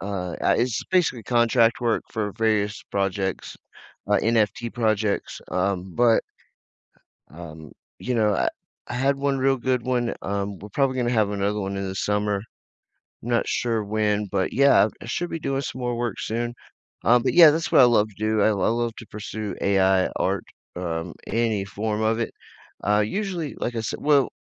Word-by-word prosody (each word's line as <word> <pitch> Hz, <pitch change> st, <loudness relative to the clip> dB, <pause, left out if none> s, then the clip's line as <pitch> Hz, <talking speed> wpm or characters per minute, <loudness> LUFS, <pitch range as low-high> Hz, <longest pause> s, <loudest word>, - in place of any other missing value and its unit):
uh, 90 Hz, -2 st, -4 dB
it's 120 Hz, -2 st, +1 dB
basically 175 Hz, -11 st, +2 dB
contract 120 Hz, 0 st, +3 dB
work 120 Hz, -2 st, +1 dB
for 105 Hz, -2 st, -2 dB
various 105 Hz, -1 st, 0 dB
projects, 95 Hz, -1 st, -2 dB, 0.5 s
uh, 105 Hz, -, +4 dB
NFT 115 Hz, +1 st, +1 dB
projects, 110 Hz, -3 st, -1 dB
um, 90 Hz, 0 st, -1 dB
but 120 Hz, -2 st, +4 dB, 1.1 s
um, 80 Hz, -2 st, -10 dB, 0.3 s
you 125 Hz, -, -3 dB
know, 105 Hz, -3 st, +2 dB
I -, -, +1 dB, 0.4 s
I -, -, -6 dB
had 135 Hz, +3 st, +1 dB
one 140 Hz, 0 st, 0 dB
real 135 Hz, +1 st, +2 dB
good 125 Hz, -1 st, 0 dB
one, 125 Hz, -2 st, -1 dB
um, 100 Hz, 0 st, -3 dB
we're 105 Hz, -, -10 dB
probably 130 Hz, +4 st, 0 dB
gonna 120 Hz, -1 st, 0 dB
have 110 Hz, -4 st, +2 dB
another 105 Hz, +1 st, -1 dB
one 100 Hz, 0 st, -3 dB
in 95 Hz, 0 st, -3 dB
the 95 Hz, -, -5 dB
summer. 105 Hz, 0 st, 0 dB, 0.8 s
I'm 115 Hz, -, -7 dB
not 120 Hz, -1 st, +1 dB
sure 115 Hz, -3 st, -1 dB
when, 105 Hz, 0 st, 0 dB
but, 95 Hz, -1 st, 0 dB
yeah, 140 Hz, -5 st, +5 dB
I -, -, -8 dB
should 175 Hz, +9 st, -2 dB
be 165 Hz, -, -3 dB
doing 135 Hz, -3 st, -2 dB
some 130 Hz, -1 st, -6 dB
more 120 Hz, 0 st, -1 dB
work 120 Hz, -1 st, -3 dB
soon. 120 Hz, +2 st, -3 dB, 0.5 s
Um, 120 Hz, +2 st, +5 dB
but, -, -, 0 dB
yeah, 170 Hz, -3 st, +9 dB
that's 160 Hz, +2 st, -1 dB
what -, -, +6 dB
I -, -, +9 dB
love 110 Hz, -3 st, +4 dB
to 105 Hz, -, -18 dB
do. 110 Hz, 0 st, 0 dB
I -, -, +4 dB
I -, -, +3 dB, 0.2 s
love 115 Hz, 0 st, -1 dB
to 120 Hz, -, -10 dB
pursue 105 Hz, 0 st, -6 dB
AI 95 Hz, -1 st, +3 dB
art, -, -, 0 dB, 0.3 s
um, 85 Hz, -1 st, -4 dB
any 110 Hz, -4 st, 0 dB
form 105 Hz, +2 st, -3 dB
of 110 Hz, +1 st, +1 dB
it. 115 Hz, -, -2 dB, 0.5 s
Uh, 105 Hz, 0 st, +2 dB
usually, 185 Hz, -, -3 dB
like 120 Hz, -, -3 dB
I -, -, 0 dB
sai 110 Hz, -, -3 dB
well, 145 Hz, -3 st, +3 dB
110 Hz, 180 wpm, -24 LUFS, 100-120 Hz, 1.1 s, yeah